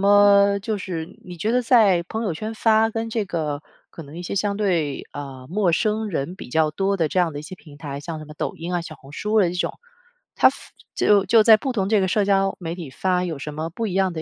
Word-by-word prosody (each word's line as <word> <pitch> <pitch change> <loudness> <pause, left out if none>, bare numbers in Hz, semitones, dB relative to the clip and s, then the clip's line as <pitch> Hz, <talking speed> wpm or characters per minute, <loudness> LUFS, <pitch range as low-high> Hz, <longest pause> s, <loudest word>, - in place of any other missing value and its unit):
么 200 0 +5
就 210 +1 -2
是 170 -4 -6
你 180 -1 -9
觉 210 +7 -1
得 250 +1 +2
在 215 -7 +4
朋 220 +5 -4
友 195 - -1
圈 215 +7 -5
发， 220 0 +3
跟 225 0 -3
这 220 -2 -1
个 155 -5 -3 0.3
可 165 - -9
能 145 +3 -12
一 175 - -6
些 180 - -4
相 200 0 0
对， 170 -9 0
呃， 135 -3 -8
陌 185 0 +1
生 215 +4 0
人 170 -1 -3
比 - - -10
较 155 +4 +2
多 195 +5 0
的 165 -4 +1
这 185 - -1
样 175 -3 +2
的 145 - -6
一 - - -10
些 160 - -8
平 150 -5 -15
台， 145 -2 -6
像 160 +1 -6
什 155 - -8
么 150 0 -12
抖 - - -3
音 170 +2 -5
啊， 175 - 0
小 165 -2 -8
红 135 -1 -16
书 210 +6 +1
的 180 - +3
这 - - -6
种， - - -1 0.6
它 - - +6
发 - - -9 0.4
就 205 -2 +4
就 220 +2 +5
在 220 -1 +8
不 260 +5 -2
同 195 -5 -1
这 210 -1 +3
个 190 - +1
社 200 +2 +1
交 195 -1 +2
媒 165 -2 -4
体 170 -5 -7
发 180 +6 0
有 165 -5 -3
什 150 +2 -6
么 155 +2 -4
不 225 +7 -4
一 195 - -3
样 190 -1 +2
的 160 -2 -5
185 Hz, 285 characters per minute, -22 LUFS, 160-210 Hz, 0.6 s, 在